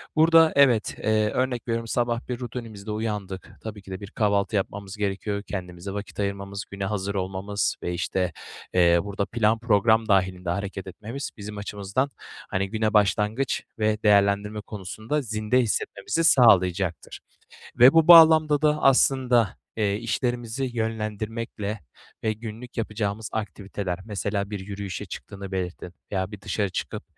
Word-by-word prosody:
Burada, 160 0 +6
evet, 130 -6 +4
eee, 110 0 +2
örnek 125 0 -1
veriyorum, 115 0 -2
sabah 120 0 -1
bir 125 -1 -3
rutinimizde 115 -4 -7
uyandık. 105 -4 -4
Tabii 110 -2 -7
ki 95 - -12
de 95 - -5
bir 100 - -9
kahvaltı 100 0 +1
yapmamız 100 +1 -3
gerekiyor. 100 0 -2
Kendimize 90 -1 -6
vakit 100 +1 -7
ayırmamız, 100 0 -3
güne 100 -1 -4
hazır 100 0 -2
olmamız 95 +2 -2
ve, 90 - -2
işte, 90 0 -1 0.4
eee, 85 -1 +5
burada 100 0 -2
plan 115 0 +1
program 110 0 +3
dâhilinde 95 -3 +1
hareket 95 +1 -3
etmemiz 115 +8 -6
bizim 105 0 -7
açımızdan, 105 +6 -2 0.4
hani, 95 +1 -1
güne 110 0 0
başlangıç 105 +5 +1 0.2
ve 110 0 0
değerlendirme 100 0 +3
konusunda 110 +8 -4
zinde 110 0 0
hissetmemizi 115 +6 -1
sağlayacaktır. 95 - +3 0.6
Ve 125 +3 +9
bu 165 -1 +4
bağlamda 160 -3 +8
da 150 0 +2
aslında, 130 -5 +3 0.2
eee, 105 -2 +1
işlerimizi 120 +2 -2
yönlendirmekle 110 -2 -3 0.4
ve 110 - +2
günlük 115 +2 -9
yapacağımız 105 -1 -3
aktiviteler 100 -2 -4
mesela, 100 -1 -3
bir 105 - -3
yürüyüşe 100 0 -6
çıktığını 100 +2 -8
belirtin 90 -1 -4 0.2
veya 95 -1 -1
bir 105 - -8
dışarı 105 0 -1
çıkıp, - - -5
105 Hz, 140 wpm, -25 LUFS, 100-115 Hz, 0.6 s, Ve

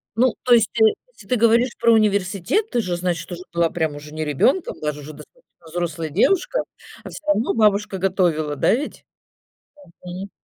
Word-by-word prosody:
Ну, 250 +2 +2
то 245 - +4
есть, 225 -2 +4
э, - - +8 0.3
если - - -17
ты 250 - +1
говоришь 235 +2 +3
про 235 0 +4
университет, 205 - +1
ты 240 - +1
же, 180 -3 -2
значит, 175 -1 -3
уже 175 0 -6
была 170 -1 +2
прям 160 -3 -2
уже 150 +1 -10
не 155 0 -3
ребёнком, 255 - +1
даже 150 -1 -3
уже 155 +2 -9
достаточно - - -18
взрослая 165 -1 -3
девушка, 385 - +1 0.4
а - - -8
всё 305 - -11
равно 245 -6 +1
бабушка 210 -3 +2
готовила, 175 -6 0
да, - - +2
ведь? 280 +5 -4 1.0
Мгм. 185 +2 -7
190 Hz, 180 wpm, -21 LUFS, 165-235 Hz, 1.0 s, э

